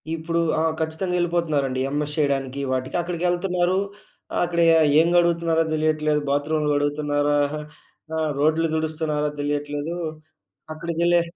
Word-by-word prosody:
ఇప్పుడూ 165 +1 -1 0.2
ఆ! - - +1 0.2
ఖచ్చితంగా 160 +3 -2
యెళ్ళిపోతున్నారండి. 155 -7 0
ఎంఎస్ 150 +1 -2
చెయ్యడానికి 140 -2 0
వాటికి 130 0 -2
అక్కడకెళ్తన్నారూ, 175 +1 0 0.6
ఆహ్, - - +1
అక్కడ 170 0 -2 0.4
ఏం 165 - +4
కడుగుతున్నారో 170 -1 +3
తెలియట్లేదు. 155 -1 +1
బాత్రూమ్‌లు 150 +2 0
కడుగుతున్నారా? 145 0 +1 0.8
ఆహ్, 155 -1 0
రోడ్లు 160 +2 +2
తుడుస్తున్నారో 155 -1 -1
తెలియట్లేదూ. 145 +3 -2 0.8
అక్కడికెళ్ళే 170 +2 +1
155 Hz, 105 wpm, -23 LUFS, 145-170 Hz, 0.8 s, ఏం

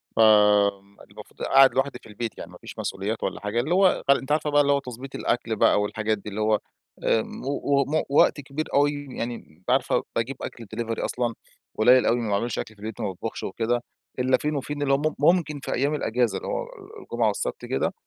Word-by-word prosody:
ف - - -4
آمم، 105 -2 +4
المفروض - - -14
قاعد 135 0 +6
لوحدي 135 +1 -1
في - - -15
البيت 110 +2 -5
يعني - - -9
مافيش - - -11
مسؤوليات 105 +4 -3
والّا - - -2
حاجة، 105 +3 -1
اللي 150 +9 0
هو 190 0 +3
ف 140 - +6
أنتِ 135 +1 +1
عارفة 150 0 +1
بقى 145 0 +4
اللي 140 - +2
هو 140 - +2
تضبيط 130 +1 -9
الأكل 115 -2 -1
بقى 105 - +4
والحاجات 110 +1 -1
دي، 105 +1 -8
اللي 105 +2 -4
هو 110 -1 +2 0.4
آمم، 110 - 0
و - - -5
و 140 0 +1
وم 150 +3 0
وقت 145 +1 +4
كبير 140 +3 -4
أوي 145 +1 +4 0.2
يعني 120 0 -3
أنتِ 85 -3 -13
عارفة - - +2
باجيب 120 +4 -1
أكل 115 - -7
Delivery 115 0 -3
أصلًا 120 -1 -1 0.4
قليل 125 +3 +6
أوي 120 - +3
ما 110 - -3
باعملش 105 +4 -1
أكل 110 - -6
في 105 - -20
البيت 110 +1 -6
ما 105 - -1
باطبخش 95 +4 -5
وكده، 120 +4 -1 0.4
إلا 130 0 +3
فين 150 0 -2
وفين 145 +1 -4
اللي 135 -1 +2
هو - - +4
مم 155 +2 -1
ممكن 150 -1 +2
في - - -4
أيام 140 +4 +1
الأجازة 120 -4 0
اللي - - -7
هو - - -2
آآ، 445 -3 -12
الجمعة - - 0
والسبت - - -3
كده، - - -1
125 Hz, 225 wpm, -25 LUFS, 110-145 Hz, 0.4 s, قاعد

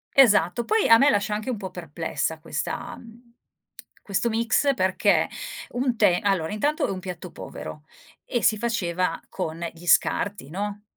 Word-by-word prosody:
Esatto. 225 -4 +5
Poi 440 0 +2
a 230 - +8
me 285 - +6
lascia 210 -3 +1
anche 215 +5 -3
un 245 - -1
po' 190 -2 -6
perplessa 165 -1 -3
questa - - -4
mhmm, 235 +1 -16 0.7
questo 200 +4 0
mix 230 +5 +2
perché 190 -4 +2 0.4
un 250 0 -1
te 190 -5 +4
allora, 190 -6 0
intanto 295 +8 0
è - - -2
un 185 - -4
piatto 180 -1 -7
povero 150 - -8 0.4
e 240 - -2
si 215 - +4
faceva 185 -7 -1
con 165 +2 -4
gli 170 +1 -14
scarti, 195 -7 +2
no, 205 +3 -4
205 Hz, 160 wpm, -25 LUFS, 175-235 Hz, 0.7 s, a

